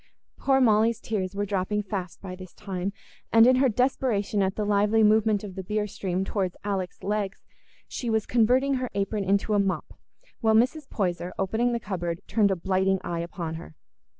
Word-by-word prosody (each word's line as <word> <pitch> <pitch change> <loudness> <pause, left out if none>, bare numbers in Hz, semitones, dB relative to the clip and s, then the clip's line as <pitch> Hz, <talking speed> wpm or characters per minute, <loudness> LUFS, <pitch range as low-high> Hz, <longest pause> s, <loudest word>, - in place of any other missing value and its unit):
Poor 270 -1 +3
Molly's 225 -2 +3
tears 200 -5 -3
were 205 0 -1
dropping 205 +1 -1
fast 190 -3 -5
by 185 -2 -6
this 185 -1 -12
time, 195 -1 -4 0.4
and 225 0 +7
in 255 +1 +5
her 265 0 +4
desperation 230 -4 +1
at 190 0 0
the 210 - -1
lively 210 +2 +3
movement 215 -1 +3
of 200 -3 -7
the 190 - -5
beer 210 +3 -1
stream 190 -2 -3
towards 190 -3 -2
Alick's 195 -3 -3
legs, 205 0 -2 0.4
she 240 - -4
was 220 -1 +1
converting 250 +4 +3
her 255 - -2
apron 200 +1 -1
into 200 +2 +1
a 205 - +3
mop, 195 -1 -1 0.5
while 220 -2 +3
Mrs. 260 +6 +2
Poyser, 180 -3 -2
opening 220 +6 +1
the 235 - -1
cupboard, 175 -5 -4
turned 210 -2 +2
a 195 - +1
blighting 190 +2 +1
eye 170 -1 -3
upon 170 -1 -4
her. 160 - -13
205 Hz, 185 wpm, -26 LUFS, 190-220 Hz, 0.5 s, and